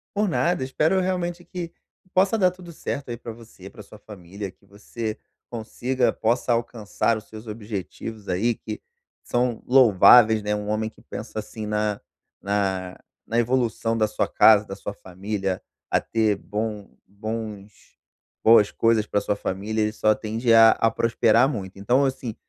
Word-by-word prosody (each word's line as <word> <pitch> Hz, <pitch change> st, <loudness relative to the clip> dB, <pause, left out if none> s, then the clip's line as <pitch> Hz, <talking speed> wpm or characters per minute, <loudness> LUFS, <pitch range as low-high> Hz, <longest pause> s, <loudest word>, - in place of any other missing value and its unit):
Por 205 Hz, 0 st, +1 dB
nada, 170 Hz, -3 st, 0 dB
espero 155 Hz, +8 st, +1 dB
realmente 175 Hz, -1 st, -2 dB
que 175 Hz, -1 st, -6 dB, 0.3 s
que 185 Hz, -, -32 dB
possa 195 Hz, +4 st, +3 dB
dar 185 Hz, -3 st, +3 dB
tudo 180 Hz, -1 st, -12 dB
certo 145 Hz, -4 st, -5 dB
aí 120 Hz, -, -4 dB
pra 115 Hz, 0 st, -8 dB
você, 110 Hz, -4 st, -14 dB
pra 105 Hz, -, -12 dB
sua 105 Hz, +1 st, -14 dB
família, 100 Hz, -1 st, -9 dB
que -, -, -37 dB
você 110 Hz, +2 st, -6 dB, 0.3 s
consiga 120 Hz, +1 st, -1 dB
possa 120 Hz, +2 st, 0 dB
alcançar 115 Hz, -1 st, -1 dB
os 110 Hz, -, -11 dB
seus 110 Hz, +1 st, -11 dB
objetivos 105 Hz, 0 st, -7 dB
aí 105 Hz, +7 st, +1 dB
que 110 Hz, -1 st, -7 dB, 0.4 s
são 120 Hz, -1 st, -1 dB
louváveis, 115 Hz, -2 st, +6 dB
né, 105 Hz, 0 st, 0 dB
um 105 Hz, 0 st, -5 dB
homem 110 Hz, +1 st, -1 dB
que -, -, -22 dB
pensa 110 Hz, 0 st, -7 dB
assim 110 Hz, +1 st, -7 dB
na 105 Hz, -1 st, -1 dB, 0.4 s
na 95 Hz, -2 st, -1 dB, 0.3 s
na 115 Hz, -, -1 dB
evolução 115 Hz, -2 st, 0 dB
da 110 Hz, -1 st, +2 dB
sua 105 Hz, -, -1 dB
casa, 105 Hz, -1 st, +5 dB
da 95 Hz, -, -6 dB
sua 100 Hz, 0 st, -6 dB
família, 95 Hz, 0 st, -4 dB, 0.3 s
a -, -, +4 dB
ter 110 Hz, -3 st, 0 dB
bom 105 Hz, -1 st, -4 dB, 0.2 s
bons 105 Hz, -1 st, -8 dB, 0.5 s
boas 110 Hz, -2 st, +6 dB
coisas 115 Hz, -2 st, +2 dB
pra 105 Hz, -, +1 dB
sua 105 Hz, -, -1 dB
família, 105 Hz, +3 st, -3 dB
ele 105 Hz, 0 st, +1 dB
só 110 Hz, 0 st, +2 dB
tende 115 Hz, +2 st, 0 dB
a 115 Hz, 0 st, +8 dB
a 115 Hz, -, +2 dB
prosperar 115 Hz, +2 st, +3 dB
muito, 100 Hz, -8 st, -6 dB
então, 125 Hz, +8 st, +2 dB
assim, 130 Hz, -4 st, -3 dB
110 Hz, 165 wpm, -24 LUFS, 105-120 Hz, 0.5 s, a